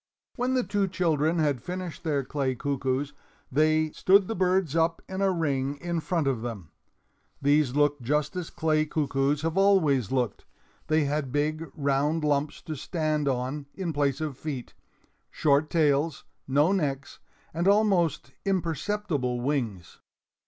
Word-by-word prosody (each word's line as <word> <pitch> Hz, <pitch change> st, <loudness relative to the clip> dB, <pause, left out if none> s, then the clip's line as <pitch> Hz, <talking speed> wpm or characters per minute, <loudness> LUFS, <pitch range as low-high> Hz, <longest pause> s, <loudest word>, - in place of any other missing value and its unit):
When 255 Hz, +1 st, 0 dB
the 255 Hz, -, +2 dB
two 200 Hz, 0 st, 0 dB
children 165 Hz, -3 st, +1 dB
had 145 Hz, -6 st, +1 dB
finished 180 Hz, -3 st, -6 dB
their 145 Hz, -4 st, 0 dB
clay 130 Hz, -1 st, -1 dB
cuckoos, 135 Hz, +1 st, -2 dB, 0.4 s
they 155 Hz, +2 st, +2 dB
stood 195 Hz, +3 st, +4 dB
the -, -, -2 dB
birds 185 Hz, -4 st, +1 dB
up 165 Hz, 0 st, +2 dB
in 190 Hz, +1 st, -4 dB
a 195 Hz, -, +3 dB
ring 145 Hz, -5 st, -1 dB
in 170 Hz, +1 st, -2 dB
front 165 Hz, -1 st, -1 dB
of 130 Hz, -5 st, 0 dB
them. 110 Hz, -9 st, -6 dB, 0.7 s
These 145 Hz, -2 st, +2 dB
looked 145 Hz, -1 st, +2 dB
just 150 Hz, +7 st, 0 dB
as 180 Hz, -2 st, -4 dB
clay 155 Hz, -2 st, +1 dB
cuckoos 145 Hz, -1 st, 0 dB
have 165 Hz, +3 st, 0 dB
always 155 Hz, -, +3 dB
looked. 125 Hz, -5 st, -1 dB, 0.4 s
They 155 Hz, 0 st, +3 dB
had 145 Hz, -2 st, -1 dB
big, 155 Hz, +3 st, -1 dB
round 145 Hz, +2 st, +1 dB
lumps 145 Hz, 0 st, 0 dB
to 155 Hz, -, -5 dB
stand 155 Hz, 0 st, -1 dB
on 135 Hz, +2 st, -2 dB
in 180 Hz, -4 st, -3 dB
place 140 Hz, -2 st, 0 dB
of 150 Hz, -4 st, -4 dB
feet, 140 Hz, -6 st, -5 dB, 0.6 s
short 145 Hz, 0 st, +2 dB
tails, 150 Hz, -1 st, +1 dB, 0.2 s
no 145 Hz, +6 st, +3 dB
necks, 145 Hz, -7 st, -2 dB, 0.3 s
and 170 Hz, +3 st, 0 dB
almost 195 Hz, -, +2 dB
imperceptible 170 Hz, -7 st, -1 dB
wings. 120 Hz, -9 st, -3 dB
150 Hz, 145 wpm, -27 LUFS, 140-170 Hz, 0.7 s, stood